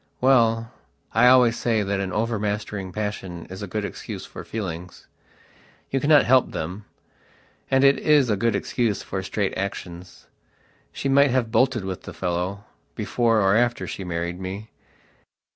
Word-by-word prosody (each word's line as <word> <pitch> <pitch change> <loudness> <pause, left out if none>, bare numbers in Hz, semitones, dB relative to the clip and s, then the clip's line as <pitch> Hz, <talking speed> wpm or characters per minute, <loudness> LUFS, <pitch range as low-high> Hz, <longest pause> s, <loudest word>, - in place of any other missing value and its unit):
Well, 115 -3 +3 0.4
I 115 +3 +5
always 125 -2 +6
say 110 -3 +1
that 100 0 -1
an 95 -1 -2
overmastering 105 -3 -2
passion 95 -4 -5
is 95 - -7
a 100 - -4
good 105 +2 -3
excuse - - -7
for - - -9
feelings. 90 -5 -6 0.9
You 135 - +1
cannot 145 0 +5
help 130 +2 +4
them. 90 +6 -5 0.8
And 135 0 +3
it 140 0 +5
is 150 -4 +4
a - - +3
good 115 +2 +1
excuse 110 +1 -1
for 95 - -4
straight 95 +1 -2
actionsshe 90 -2 -6 0.8
might 140 +1 +5
have 120 -3 0
bolted 125 -4 +2
with 95 -1 -5
the - - -9
fellow, 90 +3 -2 0.3
before 115 -3 +1
or 95 +1 +3
after 120 +1 +1
she 95 - -6
married 85 0 -3
me. 95 +4 -6
105 Hz, 150 wpm, -24 LUFS, 95-120 Hz, 0.9 s, always